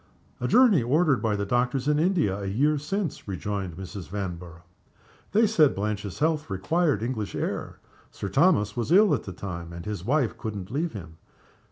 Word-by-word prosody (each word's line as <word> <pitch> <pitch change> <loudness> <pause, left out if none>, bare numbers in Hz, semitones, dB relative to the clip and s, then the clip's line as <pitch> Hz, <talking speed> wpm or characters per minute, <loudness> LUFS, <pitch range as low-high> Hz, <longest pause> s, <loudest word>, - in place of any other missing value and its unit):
"A 125 - -1
journey 225 - +5
ordered 140 0 +2
by 110 -2 +1
the 100 0 -2
doctors 125 +4 0
in 150 0 +3
India 165 - +2
a 100 - -4
year 145 +9 +2
since," 165 - -3
rejoined 95 -2 -4
Mrs. 95 0 -8
Vanborough. 90 -3 -6 0.7
"They 220 +3 +4
said 165 -10 +4
Blanche's 100 -1 -3
health 155 -3 0
required 145 - 0
English 115 -4 -3
air. - - -3 0.3
Sir - - -6
Thomas 105 - +3
was 120 +4 -2
ill 200 0 +6
at 130 - -1
the 95 - -6
time, 85 -3 -6
and 85 +1 -8
his 105 -4 -4
wife 130 +1 +1
couldn't 105 -3 -5
leave 160 +5 -1
him. 85 -6 -9
110 Hz, 175 wpm, -26 LUFS, 95-150 Hz, 0.7 s, ill